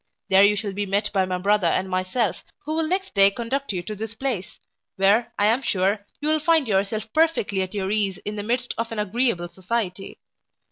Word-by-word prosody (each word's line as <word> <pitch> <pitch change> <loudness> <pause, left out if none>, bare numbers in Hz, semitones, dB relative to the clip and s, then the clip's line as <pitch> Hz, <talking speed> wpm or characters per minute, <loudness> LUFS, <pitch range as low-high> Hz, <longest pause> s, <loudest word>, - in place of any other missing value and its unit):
There 190 +1 +6
you 205 +1 +5
shall 205 -1 -3
be 205 +1 -3
met 200 +2 0
by 190 -2 +2
my 185 0 -2
brother 200 0 +2
and 185 +3 +1
myself, 185 +3 -1 0.2
who 310 +1 -2
will 320 -1 0
next 380 +3 -2
day 195 -1 +6
conduct 240 +6 -3
you 180 -3 -3
to 215 +4 -6
this 220 +2 -6
place, 230 -7 -3 0.4
where, 200 +5 +3
I 205 - +2
am 230 +5 +3
sure, 200 -2 0
you 295 - -3
will 310 0 +3
find 320 -3 +3
yourself 215 +2 -1
perfectly 310 -12 +2
at 185 +2 -4
your 190 -2 -1
case 200 -3 +1
in 210 - -3
the 205 - -3
midst 245 +3 -1
of 230 0 -2
an 225 - -5
agreeable 210 -3 0
society. 190 0 -4
210 Hz, 215 wpm, -24 LUFS, 195-235 Hz, 0.4 s, There